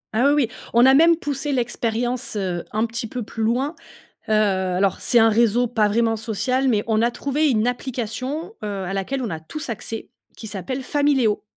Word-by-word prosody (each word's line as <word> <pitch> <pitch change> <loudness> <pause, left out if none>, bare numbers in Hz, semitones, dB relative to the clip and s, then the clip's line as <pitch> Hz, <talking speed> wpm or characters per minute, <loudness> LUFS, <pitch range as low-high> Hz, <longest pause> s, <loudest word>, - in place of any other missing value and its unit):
Ah, 245 +5 +4
oui, 290 -2 +4
oui, - - -11 0.3
on 240 +1 +7
a 265 - +7
même 330 +4 +6
poussé 290 -2 -3
l'expérience, 240 -1 -1
heu, 185 -4 -2
un 215 +2 +1
petit 230 0 -4
peu 245 +1 -5
plus 225 - -7
loin. 250 +8 +1 0.6
Heu, - - 0
alors 190 -2 +1
c'est 245 - +3
un 225 0 +6
réseau 235 +2 +3
pas 220 -3 +1
vraiment 225 +2 +1
social, 255 +4 -1
mais 215 -4 +2
on 220 -1 +2
a 235 - +3
trouvé 285 +4 0
une 220 -2 +2
application, 255 - -3
heu, - - -2 0.2
à 195 +2 -4
laquelle 230 +8 -2
on 235 - -2
a 160 - -4
tous 300 - -7
accès 225 0 -5 0.3
qui 220 - -9
s'appelle 220 +6 -4
Famileo 270 -6 +1
235 Hz, 195 wpm, -22 LUFS, 215-265 Hz, 0.6 s, on